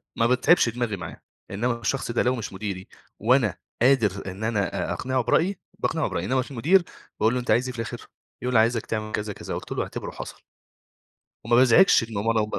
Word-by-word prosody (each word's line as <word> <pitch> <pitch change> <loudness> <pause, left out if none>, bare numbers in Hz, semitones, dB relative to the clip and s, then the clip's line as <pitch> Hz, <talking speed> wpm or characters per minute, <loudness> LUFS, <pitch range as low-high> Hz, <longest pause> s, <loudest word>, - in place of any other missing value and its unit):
ما 115 - +2
باتعبش 125 +2 +4
دماغي 120 -3 -2
معاه. 90 - -8 0.3
إنما 120 +4 -1
الشخص 120 +2 -1
ده 120 - +1
لو 125 +1 +2
مش 110 -4 -6
مديري، 95 -1 -5 0.3
وأنا 115 -3 +2 0.2
قادر 105 -7 +2
إن 100 +4 -8
أنا 105 -4 -1
أ - - 0
أقنعه 130 0 -1
برأيي، 185 - +1 0.2
باقنعه 160 -1 0
برأيي. - - -3
إنما 130 0 +1
المدير 170 +10 +3 0.4
باقول 110 +2 +3
له 125 - 0
أنت 125 - -2
عايز 125 +2 +3
إيه 130 - -4
في 115 - -8
الآخر؟ 115 - -6 0.3
يقول 125 0 -2
لي 110 - +6
عايزك 115 0 +2
تعمل 110 -1 -3
كذا، 105 -1 -3
كذا. - - -7
قُلت - - -7
له - - -1
اعتبره - - -6
حصل. - - -9 1.0
وما 120 - +2
بازعجش 130 +6 +6
إن 105 - -5
هو 100 - -1
ما 115 -1 +2
115 Hz, 205 wpm, -25 LUFS, 110-130 Hz, 1.0 s, لي